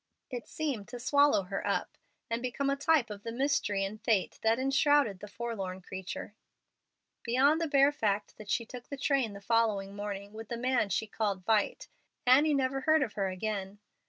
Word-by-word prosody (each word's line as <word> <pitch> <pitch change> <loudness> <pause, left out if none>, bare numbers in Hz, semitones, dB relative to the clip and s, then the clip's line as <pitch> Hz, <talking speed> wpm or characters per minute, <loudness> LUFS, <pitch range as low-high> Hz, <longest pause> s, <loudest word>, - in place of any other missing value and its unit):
It 245 -2 -5
seemed 275 -10 -3
to 245 - -7
swallow 285 -4 +4
her 195 +2 -4
up, - - -1 0.3
and 230 +1 -2
become 270 +3 -1
a - - +1
type 280 -4 +2
of 205 -1 -7
the 230 - -5
mystery 230 -6 0
and 210 +2 -7
fate 210 -6 +1
that 225 +1 +3
enshrouded 270 -5 +3
the 210 - -8
forlorn 200 -4 -4
creature. 190 +2 -7 0.9
Beyond 275 +7 +3
the 330 - +1
bare 280 0 +5
fact 210 -8 -1
that 210 -1 -11
she 230 - 0
took 245 +1 -10
the 280 - -5
train 270 -6 +1
the 200 - -8
following 205 -3 +1
morning 205 0 -5
with 220 0 -9
the 235 - -3
man 250 -3 +1
she 210 +4 0
called 205 -3 -2
"Vight," 215 -1 +1 0.4
Annie 285 +4 +5
never 270 0 0
heard 310 +1 +4
of 225 - -4
her 200 -2 -1
again. 195 +1 -4
230 Hz, 190 wpm, -31 LUFS, 200-270 Hz, 0.9 s, bare